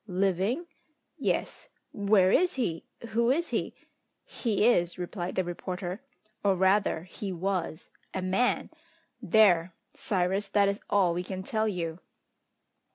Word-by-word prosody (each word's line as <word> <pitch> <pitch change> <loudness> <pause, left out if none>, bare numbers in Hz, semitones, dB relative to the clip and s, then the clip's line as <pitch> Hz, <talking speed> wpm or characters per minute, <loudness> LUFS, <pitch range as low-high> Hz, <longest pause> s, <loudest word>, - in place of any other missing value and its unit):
"Living?" 195 - 0 0.5
"Yes." - - -2 0.2
"Where 200 -2 +3
is 360 - +3
he? 175 -11 -2 0.2
Who 235 +2 +2
is 330 +6 +1
he?" - - -2 0.5
"He 215 -3 0
is," 175 -8 +3
replied 180 0 -4
the 185 - +1
reporter, 180 +2 -5 0.4
"or 200 -2 +3
rather 190 -3 +2
he 190 +2 -6
was, 180 -2 -3 0.2
a 190 - -3
man! 190 +7 +1 0.5
There, 185 -5 +4 0.2
Cyrus, 190 +1 0
that 200 0 +3
is 200 +1 -1
all 190 -4 +3
we 175 +1 -2
can 190 0 -5
tell 220 +2 0
you!" 170 -4 -3
190 Hz, 130 wpm, -28 LUFS, 180-210 Hz, 0.5 s, There